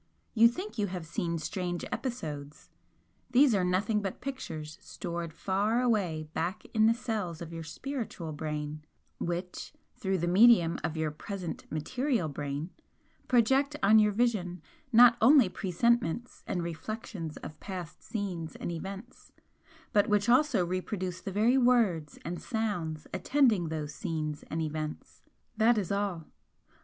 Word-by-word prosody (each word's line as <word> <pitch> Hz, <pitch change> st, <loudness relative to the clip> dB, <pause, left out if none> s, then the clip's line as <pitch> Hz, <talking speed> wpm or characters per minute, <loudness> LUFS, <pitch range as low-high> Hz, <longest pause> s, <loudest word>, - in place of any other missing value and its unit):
You 230 Hz, 0 st, +7 dB
think 360 Hz, -, -5 dB
you 205 Hz, -, +1 dB
have 180 Hz, -3 st, -5 dB
seen 170 Hz, +1 st, -2 dB
strange 175 Hz, +2 st, -3 dB
episodes 150 Hz, -, -5 dB, 0.6 s
these 255 Hz, 0 st, +5 dB
are 195 Hz, -3 st, +2 dB
nothing 200 Hz, +4 st, +1 dB
but 195 Hz, -2 st, -4 dB
pictures 160 Hz, -, -6 dB
stored 170 Hz, -2 st, -5 dB
far 200 Hz, +7 st, 0 dB
away 200 Hz, -11 st, +1 dB
back 170 Hz, +5 st, -2 dB
in 220 Hz, -1 st, +5 dB
the 230 Hz, -, +4 dB
cells 210 Hz, -9 st, -3 dB
of 170 Hz, -1 st, -7 dB
your 165 Hz, -, -5 dB
spiritual 210 Hz, -, -5 dB
brain, 150 Hz, 0 st, -4 dB, 0.4 s
which 175 Hz, +7 st, -4 dB, 0.2 s
(through 195 Hz, -6 st, -1 dB
the 175 Hz, 0 st, -1 dB
medium 185 Hz, -3 st, +6 dB
of 160 Hz, +1 st, -2 dB
your 160 Hz, -1 st, 0 dB
present 180 Hz, +3 st, -6 dB
material 230 Hz, -, 0 dB
brain) 145 Hz, +3 st, -4 dB, 0.6 s
project 265 Hz, +4 st, +3 dB
on 215 Hz, +2 st, +7 dB
your 210 Hz, -1 st, +4 dB
vision 195 Hz, -7 st, 0 dB, 0.3 s
not 235 Hz, 0 st, +8 dB
only 255 Hz, -3 st, +7 dB
presentments 235 Hz, +3 st, 0 dB
and 175 Hz, -, -1 dB
reflections 170 Hz, -1 st, -5 dB
of 155 Hz, 0 st, -9 dB
past 180 Hz, -5 st, -7 dB
scenes 185 Hz, -, -4 dB
and -, -, -4 dB
events, 195 Hz, +7 st, -8 dB, 0.6 s
but 205 Hz, 0 st, +4 dB
which 210 Hz, +1 st, +2 dB
also 250 Hz, -6 st, +4 dB
reproduce 185 Hz, 0 st, -3 dB
the 195 Hz, -, -5 dB
very 225 Hz, +7 st, +3 dB
words 220 Hz, -, +2 dB
and 170 Hz, +2 st, -4 dB
sounds 180 Hz, -9 st, -2 dB
attending 220 Hz, -, +3 dB
those 155 Hz, -2 st, -4 dB
scenes 155 Hz, -5 st, -3 dB
and 160 Hz, +1 st, -1 dB
events. 155 Hz, 0 st, -5 dB, 0.4 s
That 225 Hz, +1 st, +5 dB
is 200 Hz, -4 st, -1 dB
all. 200 Hz, -5 st, -1 dB
185 Hz, 140 wpm, -30 LUFS, 165-225 Hz, 0.6 s, not